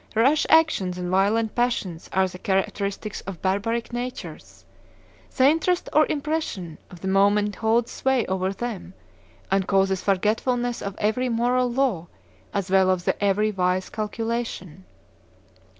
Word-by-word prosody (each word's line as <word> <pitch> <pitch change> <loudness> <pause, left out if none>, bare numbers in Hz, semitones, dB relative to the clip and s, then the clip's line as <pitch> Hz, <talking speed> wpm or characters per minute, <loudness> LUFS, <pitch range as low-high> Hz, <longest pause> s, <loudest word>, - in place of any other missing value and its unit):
Rash 270 +8 +3
actions 310 - +3
and 180 0 -4
violent 210 +4 +2
passions 235 -9 -1
are 190 0 +2
the 180 0 -10
characteristics 200 +2 -2
of 195 -4 -8
barbaric 225 +5 -1
natures; 245 +1 -7 0.7
the 260 0 +6
interest 330 +4 +1
or 305 +1 +5
impression 285 - -3
of 180 -3 -13
the 190 - -4
moment 205 +2 +2
holds 230 +1 +1
sway 265 -3 +1
over 190 0 -1
them, 195 -3 -6 0.6
and 195 -1 +1
causes 195 -1 +2
forgetfulness 230 +5 0
of 200 -1 -5
every 235 +5 0
moral 245 +2 +1
law 235 -10 0 0.4
as 195 -2 -3
well 190 -1 +4
as 185 -1 0
of - - +4
every 205 +2 +2
wise 185 -1 0
calculation. 215 -5 -4
210 Hz, 135 wpm, -24 LUFS, 190-240 Hz, 0.7 s, the